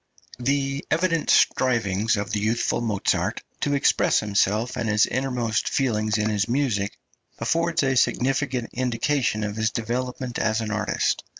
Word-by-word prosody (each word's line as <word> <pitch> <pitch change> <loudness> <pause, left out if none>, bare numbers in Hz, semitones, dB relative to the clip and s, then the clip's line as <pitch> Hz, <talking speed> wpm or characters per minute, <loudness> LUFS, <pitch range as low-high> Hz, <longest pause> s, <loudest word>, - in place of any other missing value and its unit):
The 135 +2 -1
evident 165 -1 +1
striving 110 -5 +2
of 100 - -3
the 105 - 0
youthful 110 +3 0
Mozart 105 -4 -1 0.2
to 145 - 0
express 140 - +3
himself 105 +3 0
and 110 - -2
his 105 0 +4
innermost 125 -4 -1
feelings 110 -5 0
in 105 0 0
his 105 +1 0
music 115 -7 0 0.4
affords 165 +7 0
a 135 -1 +1
significant 130 -1 0
indication 125 -2 0
of 105 +1 -4
his 110 0 +1
development 125 +2 -3
as 110 0 +1
an 110 -2 -3
artist. 105 0 0
115 Hz, 140 wpm, -24 LUFS, 105-135 Hz, 0.4 s, his